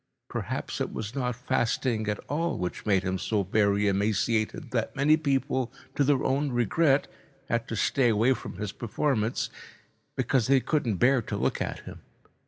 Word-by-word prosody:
Perhaps - - -4
it - - -1
was 110 +1 -5
not 125 -3 -1
fasting 120 -2 0
at 105 -1 0
all 165 +4 -2
which 90 +4 -4
made 95 -2 +3
him 95 0 -1
so 105 +1 0
very 105 +1 +2
emaciated 110 - 0
that 115 +1 -1
many 145 +2 +5
people, 135 -4 0 0.2
to 145 - +2
their 140 -1 +2
own 140 +1 +1
regret, 135 - +2 0.4
had 115 0 0
to 115 - -3
stay 125 +3 +2
away 115 +4 +3
from 125 - -8
his 105 0 -3
performance, 120 0 -1 0.7
because 125 -5 +1
they 135 0 +5
couldn't 130 -6 0
bear 125 +4 +4
to - - -4
look - - 0
at - - -3
him. - - -10
120 Hz, 170 wpm, -27 LUFS, 105-135 Hz, 0.7 s, many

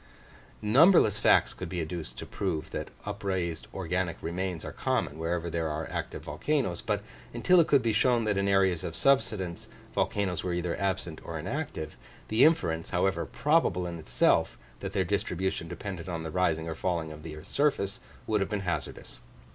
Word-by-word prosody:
Numberless 115 - +6
facts - - +4
could - - -6
be 90 - -3
adduced 80 -6 -5
to - - -6
prove 80 - -3
that - - -4 0.2
upraised 95 -5 -2
organic 90 -2 -2
remains 90 0 -3
are - - -5
common 75 - -1
wherever 85 +1 -1
there 85 -1 -1
are 80 +1 -3
active - - -4
volcanos; 90 - -1
but 105 -2 -1 0.3
until 180 +10 +5
it 165 - +5
could 140 -3 +4
be 115 -2 +2
shown 120 +2 +3
that 105 -2 +1
in 100 0 +1
areas 95 -4 +3
of 85 - -4
subsidence, 95 -5 +1 0.3
volcanos 95 -5 0
were 90 - -1
either 85 0 -1
absent 95 -4 -2
or - - -5
inactive, 80 - -4 0.3
the 110 +3 +4
inference, 85 - +3
however 90 -2 +1
probable 145 - +2
in 85 -1 -5
itself, 80 - +2 0.2
that - - -5
their 95 -2 +1
distribution 95 -2 -1
depended 90 0 -6
on 85 -2 -3
the 80 - -5
rising 80 -3 +1
or 80 - -2
falling 80 -1 -2
of 75 0 -9
the 80 -1 -7
earth's 75 - -11
surface, 135 -9 +1 0.3
would 105 -2 +1
have 95 - 0
been 105 -2 -1
hazardous. 80 -8 -4
90 Hz, 180 wpm, -29 LUFS, 80-105 Hz, 0.3 s, Numberless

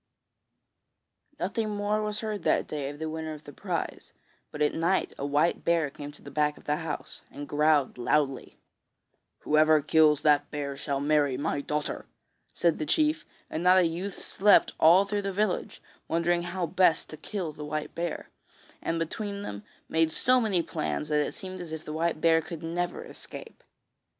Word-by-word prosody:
Nothing 215 +4 -1
more 205 +1 0
was 210 0 -3
heard 215 -2 -3
that - - +2
day 145 -2 -4
of 145 - -8
the 160 +1 -4
winner 160 0 -4
of 155 0 -10
the 145 - -11
prize, - - -4 0.4
but - - -8
at 150 - +2
night 170 +4 +1
a 140 - -3
white 150 +4 +1
bear 165 -4 +2
came 145 +1 -8
to - - -16
the 140 - -10
back 150 +1 +1
of - - -16
the 150 0 0
house, 160 -2 -5
and 145 0 -8
growled 150 -3 +2
loudly. 135 +2 0 0.8
'Whoever 155 0 +4
kills 150 0 +4
that 150 -1 +6
white 145 - -32
bear 140 -1 -4
shall 140 0 -2
marry 145 -2 +2
my 145 0 -1
daughter,' 150 +1 -3 0.4
said 170 -2 +1
the 155 - -1
chief, 310 - +1 0.2
and 160 - -4
not 180 +1 +6
a 185 - +5
youth 175 +4 -4
slept 205 +2 +4
all 175 +5 +7
through 205 +1 -1
the 195 0 -2
village, 200 0 -1 0.2
wondering 170 +1 +1
how 175 +1 -2
best 175 -1 +2
to 155 - -8
kill 180 0 -4
the 150 0 -9
white 150 0 -4
bear, 170 -1 -4 0.5
and 165 - -1
between 200 +5 -3
them 100 - -6 0.2
they 160 - -2
made 160 -1 +4
so 255 +8 +3
many 195 -7 +1
plans 155 -1 -3
that 150 -1 +3
it - - -4
seemed 185 -1 -7
as 170 -3 -8
if 160 -1 -6
the 150 - -5
white 165 0 0
bear 165 0 +4
could 165 0 -8
never 175 +2 -2
escape. 465 - -10
160 Hz, 190 wpm, -28 LUFS, 150-185 Hz, 0.8 s, all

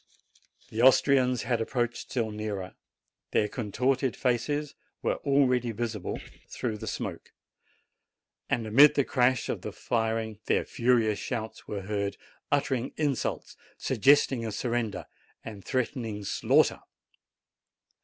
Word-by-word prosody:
The 110 - -1
Austrians 130 -1 +4
had 120 -2 0
approached 120 0 -2
still 115 -4 -1
nearer: 105 -3 -4 0.6
their 105 - +3
contorted 125 +4 0
faces 140 +4 -1 0.3
were - - +1
already 130 -4 +2
visible 110 -3 -3 0.3
through 110 -4 -3
the - - -7
smoke; - - -5 1.2
and 120 -5 0
amid 140 +7 +7
the 140 - +3
crash 125 -1 +2
of - - -3
the - - -5
firing 110 -2 -2
their - - +2
furious 115 -4 +2
shouts 110 -3 -5
were 100 -2 -4
heard, 100 0 -2 0.3
uttering 135 -3 0
insults, 145 -4 -2 0.2
suggesting 135 0 +3
a 110 - -3
sur 115 +3 -3
render, 115 -4 -2 0.4
and 105 -3 -8
threatening 115 -4 -2
slaughter. - - +2
120 Hz, 120 wpm, -28 LUFS, 110-130 Hz, 1.2 s, amid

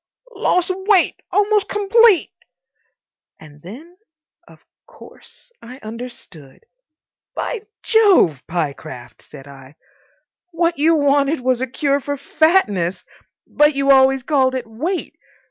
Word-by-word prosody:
"Loss 365 -4 0
of 370 - -4
weight—almost 410 +1 +1
complete." 415 -1 +3 1.1
And 150 -1 -16
then, 290 - -13 0.5
of - - -20 0.2
course, - - -17
I 250 +2 -12
understood. 225 - -11 0.7
"By 475 - -4 0.2
Jove, 390 - +3
Pyecraft," 140 -7 -6
said 140 -1 -14
I, 135 0 -15 0.7
"what 335 -2 -1
you 325 +2 +3
wanted 285 0 +1
was 255 -1 0
a 260 - -2
cure 280 +3 -1
for 285 +1 -5
fatness! 235 - 0 0.4
But 295 -1 +2
you 275 0 +2
always 265 -1 +4
called 260 -2 +1
it 255 - -4
weight. 305 - -5
275 Hz, 110 wpm, -18 LUFS, 220-350 Hz, 1.1 s, always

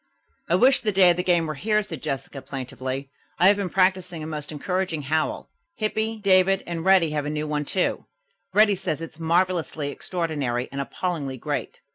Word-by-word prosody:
"I - - +4
wish 260 +2 +5
the 215 - 0
day 185 -2 +6
of 170 - -1
the 180 - 0
game 175 -2 +3
were 155 - -3
here," 210 +8 +1
said 160 -8 -7
Jessica 135 -2 -4
plaintively. 130 +1 -5 0.3
"I 180 - +4
have 200 +2 +7
been 200 -3 -2
practising 185 -3 +1
a - - -5
most 150 -1 -5
encouraging 170 +1 -2
howl. 155 +3 -1 0.2
Hippy, 220 +1 -1
David 195 -1 +3
and 170 -1 -4
Reddy 185 -4 +4
have 150 -1 -2
a - - -1
new 150 0 -2
one, 150 -1 -1
too. 185 +5 -1 0.4
Reddy 210 +1 +5
says 180 -5 -3
it's 160 -1 -10
'marvelously 165 -3 0
extraordinary 145 -8 -2
and 140 0 -3
appallingly 140 -3 -3
great.'" 145 -2 -4
165 Hz, 185 wpm, -24 LUFS, 150-190 Hz, 0.4 s, have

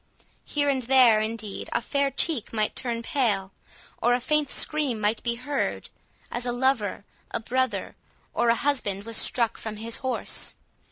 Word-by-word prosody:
Here 290 -1 0
and 270 -2 +2
there, 245 -3 +5
indeed, 215 -2 -4
a - - +2
fair 280 +3 0
cheek 275 -2 +1
might 215 -2 -1
turn 235 -2 -2
pale, 220 -10 0 0.5
or 240 +1 +4
a - - 0
faint 300 +2 +1
scream 290 -7 +1
might 215 +1 +1
be 235 -1 0
heard, 280 +4 -3 0.4
as 240 - -3
a - - +1
lover, 245 -6 0 0.2
a - - -2
brother, 260 +3 -1 0.4
or 235 - +2
a 230 - +5
husband, 225 -8 -1
was 230 +1 -3
struck 230 0 +2
from 220 -1 -5
his 225 +2 -3
horse. 260 -2 0
240 Hz, 165 wpm, -26 LUFS, 220-270 Hz, 0.5 s, there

